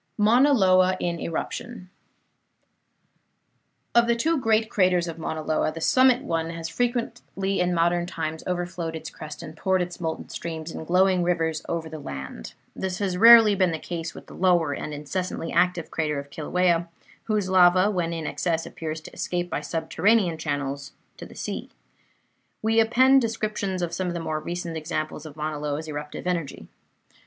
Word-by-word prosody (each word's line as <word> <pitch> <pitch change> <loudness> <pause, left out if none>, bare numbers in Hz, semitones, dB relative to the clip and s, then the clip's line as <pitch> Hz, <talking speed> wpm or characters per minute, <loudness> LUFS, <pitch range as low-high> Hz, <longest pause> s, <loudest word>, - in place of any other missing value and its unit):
MAUNA 240 +7 +5
LOA 185 -4 +4
IN 170 -1 -2
ERUPTION 185 +4 -5 2.0
Of 235 0 +5
the 235 - +3
two 315 +6 +1
great 220 -2 +2
craters 180 -4 +2
of 165 0 -6
Mauna 160 -1 -4
Loa, 155 0 0
the 165 - -7
summit 255 - +4
one 165 - -1
has 165 -1 -5
frequently 230 -4 -2
in 180 0 +2
modern 175 0 +1
times 160 -2 -4
overflowed 175 -2 -3
its 160 - -7
crest 155 +1 -9
and 155 -1 -9
poured 190 +3 +1
its 180 0 -4
molten 160 -1 -3
streams 160 -1 -5
in 160 - -7
glowing 185 +1 +3
rivers 165 -3 0
over 165 -1 -2
the 160 -1 -8
land. 65 - -7 0.2
This 185 -1 -3
has 195 -3 -1
rarely 225 +1 +9
been 185 -2 +2
the 160 - -2
case 165 0 -5
with - - -10
the - - -13
lower 175 -5 +2
and 150 - -5
incessantly 165 +3 -4
active 175 -1 +1
crater 150 -2 -1
of 140 0 -7
Kilauea, 170 +2 +1 0.4
whose 210 -3 0
lava, 185 +1 +5
when 175 -4 -1
in 165 -2 -4
excess, 165 0 -1
appears 160 -1 -6
to - - -12
escape 175 0 -3
by - - -1
subterranean 170 +2 +1
channels 140 -2 -3 0.2
to - - -9
the - - -15
sea. - - -5 0.9
We 225 +1 +3
append 260 +4 +5
descriptions 215 -5 -2
of 170 - -3
some 185 - -2
of 175 - -3
the - - -2
more 155 -2 -2
recent 175 +1 -5
examples 155 0 -4
of 145 - -12
Mauna 155 -1 -3
Loa's 150 +1 -3
eruptive 150 +1 -6
energy. 170 -5 -3
175 Hz, 170 wpm, -25 LUFS, 160-190 Hz, 2.0 s, rarely